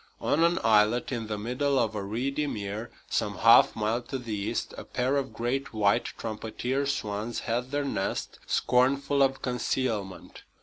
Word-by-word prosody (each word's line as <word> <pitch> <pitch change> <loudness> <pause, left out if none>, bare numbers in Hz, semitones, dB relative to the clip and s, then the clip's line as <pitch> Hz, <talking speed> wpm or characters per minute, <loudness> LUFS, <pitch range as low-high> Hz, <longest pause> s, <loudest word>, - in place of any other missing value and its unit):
On 160 +3 +2
an 170 +1 +3
islet 110 +3 +3
in 115 -3 -3
the 105 -1 -3
middle 125 +6 0
of 110 -3 +1
a 105 - -3
reedy 130 +9 -2
mere, 105 -1 -4 0.2
some - - -1
half - - +6
mile 110 +3 0
to 130 +3 -5
the 120 -4 -6
east, 100 -1 -2
a - - -7
pair 130 +2 -1
of 135 -2 -1
great 120 +1 -2
white 105 +2 +3
trumpeter 120 +5 -3
swans 110 -3 -2
had 120 +2 -2
their 145 +1 -1
nest, 95 -8 -3
scornful 140 +3 +2
of 135 0 +2
concealment. 120 -6 -2
120 Hz, 165 wpm, -28 LUFS, 110-135 Hz, 0.2 s, half